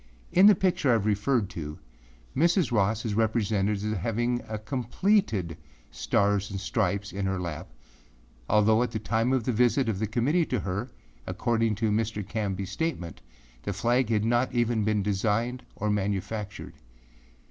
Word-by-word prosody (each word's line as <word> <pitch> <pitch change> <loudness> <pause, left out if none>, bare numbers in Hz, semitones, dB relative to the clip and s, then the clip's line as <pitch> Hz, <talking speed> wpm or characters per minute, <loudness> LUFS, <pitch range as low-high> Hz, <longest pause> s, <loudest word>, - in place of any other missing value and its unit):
In 190 +3 +7
the 210 - +8
picture 180 -5 +1
I - - +6
have 110 -3 +1
referred 105 +2 +1
to, 75 -2 -6 0.6
Mrs. 170 +1 +2
Ross 110 +1 +1
is 110 - -1
represented 105 -2 0
as 110 0 -1
having 120 +4 -1
a 110 - -3
completed 120 - 0 0.3
Stars 100 +1 +1
and 95 -1 -4
Stripes 100 -1 -1
in 100 0 -2
her 95 -1 -1
lap, 85 0 -5 0.8
although, 110 +2 +4
at 125 - 0
the 110 - -4
time 115 +3 0
of 130 -3 +1
the 125 - 0
visit 125 +2 +2
of 105 -4 -1
the 110 - -1
Committee 140 - +1
to 125 -5 -1
her, 100 +7 -3 0.4
according 115 +3 0
to 110 +1 0
Mr. 110 -1 -1
Canbyâs 100 -4 -3
statement, 100 - -3 0.4
the 100 - -3
flag 120 +5 +1
had 110 -2 +1
not 120 +2 +2
even 120 -2 +1
been 105 -1 +1
designed 110 +5 0
or 105 +1 -1
manufactured. 100 +1 -3
110 Hz, 160 wpm, -27 LUFS, 100-120 Hz, 0.8 s, the